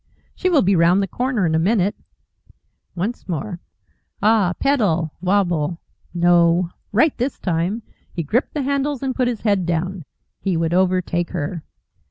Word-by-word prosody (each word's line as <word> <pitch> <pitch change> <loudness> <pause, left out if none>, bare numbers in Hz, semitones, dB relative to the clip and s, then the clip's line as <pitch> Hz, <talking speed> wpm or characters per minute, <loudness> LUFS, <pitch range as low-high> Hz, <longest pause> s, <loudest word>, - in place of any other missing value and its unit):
She 370 - -1
will 325 -6 +4
be 195 +1 +3
round 175 +3 +4
the - - -2
corner 245 -2 -1
in 160 - +1
a 160 - +3
minute. 200 +2 +2 1.0
Once 200 +5 -4
more. 180 +2 -3 0.6
Ah! 210 -4 +3
Pedal! 190 - +1
Wabble! 175 -4 +1 0.3
No! 175 0 +3 0.2
Right 255 +9 +3
this 255 +4 -1
time! 180 +5 -1 0.3
He 170 - -3
gripped 235 - -1
the 290 - -1
handles 280 0 -1
and 265 -1 -1
put 250 -1 0
his 240 -3 -2
head 200 -4 +1
down. 175 0 -2 0.3
He 190 -4 -1
would 165 0 0
overtake 180 -1 +1
her. 170 0 -4
185 Hz, 155 wpm, -21 LUFS, 170-230 Hz, 1.0 s, will